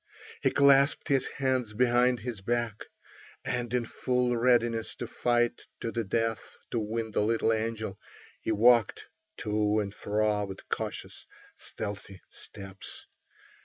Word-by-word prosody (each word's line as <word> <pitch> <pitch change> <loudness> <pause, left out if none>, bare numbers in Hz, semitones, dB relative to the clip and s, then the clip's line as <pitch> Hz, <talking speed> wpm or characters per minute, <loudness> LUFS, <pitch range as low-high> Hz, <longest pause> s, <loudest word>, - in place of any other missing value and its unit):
He - - +3
clasped 140 +2 +4
his 135 -2 +2
hands 130 -5 -1
behind 125 0 +3
his 115 -3 -5
back, 115 0 -2 0.6
and 120 -1 -2
in 125 -1 0
full 125 +1 0
readiness 120 -2 +2
to - - -5
fight 120 0 +1 0.2
to 115 - -3
the 115 0 -1
death 115 +2 -2
to 120 - 0
win 110 +1 -3
the - - +1
little 115 +1 +2
angel, 110 -3 -3 0.4
he - - -1
walked 115 0 +4 0.3
to 105 0 +1
and 100 -1 -3
fro 105 0 0
with 95 -1 -9
cautious, - - -4 0.3
stealthy 100 -2 -6
steps. 95 -1 -9
115 Hz, 130 wpm, -29 LUFS, 105-120 Hz, 0.6 s, clasped